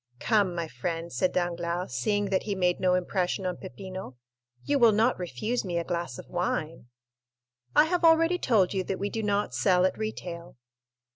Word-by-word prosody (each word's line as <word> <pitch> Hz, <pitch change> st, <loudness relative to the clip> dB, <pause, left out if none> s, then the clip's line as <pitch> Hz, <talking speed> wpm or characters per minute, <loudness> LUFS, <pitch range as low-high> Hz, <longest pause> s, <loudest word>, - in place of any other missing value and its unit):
"Come, 200 Hz, -, +2 dB
my 170 Hz, -1 st, -2 dB
friend," 170 Hz, +1 st, -4 dB
said 185 Hz, -, +1 dB
Danglars, 175 Hz, 0 st, -2 dB
seeing 205 Hz, -2 st, 0 dB
that 190 Hz, -, +2 dB
he 205 Hz, -2 st, -3 dB
made 180 Hz, -2 st, +1 dB
no 180 Hz, -1 st, +3 dB
impression 180 Hz, +1 st, -1 dB
on 180 Hz, -1 st, -2 dB
Peppino, 185 Hz, -7 st, -8 dB, 0.5 s
"you 285 Hz, -1 st, +1 dB
will 230 Hz, -3 st, +6 dB
not 225 Hz, +3 st, +2 dB
refuse 180 Hz, -, -2 dB
me 175 Hz, -3 st, -2 dB
a 170 Hz, -, 0 dB
glass 170 Hz, -8 st, -3 dB
of -, -, -10 dB
wine?" 165 Hz, -6 st, -3 dB, 0.9 s
"I 300 Hz, -, +7 dB
have 355 Hz, +2 st, -1 dB
already 330 Hz, +2 st, +5 dB
told 205 Hz, -, +2 dB
you 190 Hz, -1 st, 0 dB
that 195 Hz, -, -2 dB
we 200 Hz, 0 st, -3 dB
do 225 Hz, -, -2 dB
not 205 Hz, -8 st, 0 dB
sell 180 Hz, +9 st, +3 dB
at 185 Hz, -, +1 dB
retail." 175 Hz, -, -6 dB
185 Hz, 185 wpm, -28 LUFS, 175-210 Hz, 0.9 s, I